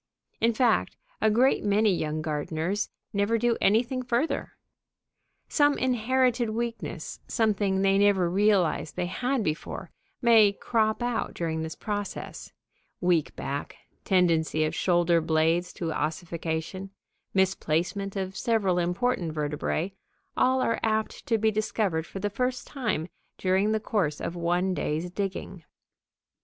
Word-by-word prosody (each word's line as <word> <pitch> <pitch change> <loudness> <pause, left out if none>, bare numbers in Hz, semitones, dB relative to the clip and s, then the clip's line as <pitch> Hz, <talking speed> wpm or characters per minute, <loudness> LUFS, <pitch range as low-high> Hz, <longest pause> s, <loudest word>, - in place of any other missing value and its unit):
In 230 - +3
fact, 235 0 +1 0.2
a 220 - +4
great 245 +5 +3
many 210 0 +3
young 155 -1 -2
gardeners 160 +6 -2 0.2
never 205 +3 +2
do 235 +1 +2
anything 235 +5 +2
further. 245 +5 -1 0.9
Some 290 -1 +3
inherited 250 -1 +1
weakness, 230 +1 -4
something 200 -4 +1
they 195 0 +4
never 200 -3 +4
realized 185 -5 +2
they 180 - -1
had 245 +7 -1
before, 155 -3 -4 0.3
may 225 -4 +6
crop 220 +2 0
out 240 -2 -2
during 160 -2 -2
this 160 0 -5
process: 205 -2 -5 0.5
weak 175 -4 +1
back, 140 +1 -4 0.3
tendency 165 -4 +2
of 155 - -2
shoulder 175 -2 +3
blades 160 +2 +1
to 165 -2 -3
ossification, 165 +4 -3 0.5
misplacement 190 +1 0
of 190 -1 -3
several 200 -6 +1
important 175 -1 0
vertebræ, 150 +4 -2 0.4
all 260 0 +3
are 230 - 0
apt 220 -1 -1
to 230 - +3
be 220 0 +2
discovered 200 -6 -1
for - - -8
the 205 +1 -2
first 250 +4 -1
time 215 - -2 0.3
during 190 +3 +2
the 220 - +1
course 190 -9 -1
of 170 - -4
one 175 +2 +1
day's 165 +1 -2
digging. 190 -2 -4
195 Hz, 130 wpm, -27 LUFS, 170-225 Hz, 0.9 s, may